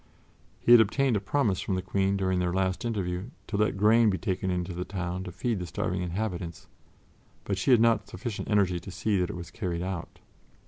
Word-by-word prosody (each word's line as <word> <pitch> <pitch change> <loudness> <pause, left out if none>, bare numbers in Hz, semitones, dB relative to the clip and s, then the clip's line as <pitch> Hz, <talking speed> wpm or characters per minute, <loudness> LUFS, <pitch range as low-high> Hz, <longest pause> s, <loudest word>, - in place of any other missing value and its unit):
He - - +2
had 120 -1 +10
obtained 125 +4 +2
a - - +2
promise 100 -2 0
from 95 - -1
the 95 - -1
Queen 95 +1 +1
during 95 -1 0
their 90 -1 0
last 95 +3 -1
interview 95 -2 -2 0.2
to 105 - -5
let 105 -1 +1
grain 110 +2 +5
be 95 - 0
taken 95 -2 -2
into 90 0 -2
the 90 +1 -3
town 90 -1 -4
to 90 - -6
feed 105 +4 -2
the 90 - -5
starving 90 +3 -2
inhabitants, 90 -2 -4 0.8
but 100 - -1
she 95 - -1
had 125 -3 +7
not 115 0 +4
had - - -22
sufficient 115 -5 -5
energy 95 -4 +2
to 90 - -10
see 100 +1 0
that 90 - 0
it - - -5
was 85 -1 -8
carried 90 -6 -3
out. 90 -2 -5
95 Hz, 220 wpm, -28 LUFS, 90-105 Hz, 0.8 s, had